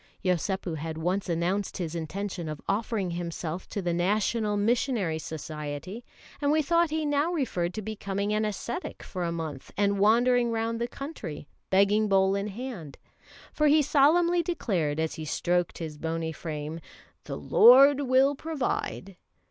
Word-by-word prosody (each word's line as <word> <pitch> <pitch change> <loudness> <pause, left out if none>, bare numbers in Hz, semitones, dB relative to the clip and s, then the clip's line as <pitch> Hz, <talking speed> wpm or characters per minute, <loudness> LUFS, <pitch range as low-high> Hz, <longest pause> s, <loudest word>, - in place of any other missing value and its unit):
Yosépu 180 -1 -1
had 160 +1 -5
once 180 +4 -1
announced 180 +4 -1
his 170 -3 -4
intention 175 +1 -4
of 155 -1 -5
offering 200 -2 -1
himself 170 0 -5
to 200 - -4
the 175 -1 0
National 210 +4 +1
Missionary 210 - +1
Society, 155 +6 -6 0.4
and 285 - +1
we 310 - +3
thought 335 +2 +3
he 310 0 -1
now 290 +3 +1
referred 225 - -1
to 215 - -4
becoming 200 -1 -3
an 215 +1 +1
ascetic 215 - -4
for 180 -2 -5
a 170 - -1
month 160 -5 -6
and 200 -1 +2
wandering 240 +3 +4
round 230 0 -2
the 235 - 0
country, 220 - -7 0.2
begging 200 +3 +3
bowl 190 0 +4
in 200 +1 -1
hand; 210 - -7 0.6
for 300 - +2
he 300 +1 +5
solemnly 335 +5 +4
declared 185 - -1
as 160 0 -1
he 160 - -6
stroked 175 +3 0
his 155 -3 -6
bony 165 0 -2
frame: 155 0 -5 0.5
"The - - -5
Lord 270 +4 +7
will 265 +1 +4
provide." 265 - -3
200 Hz, 155 wpm, -27 LUFS, 170-245 Hz, 0.6 s, Lord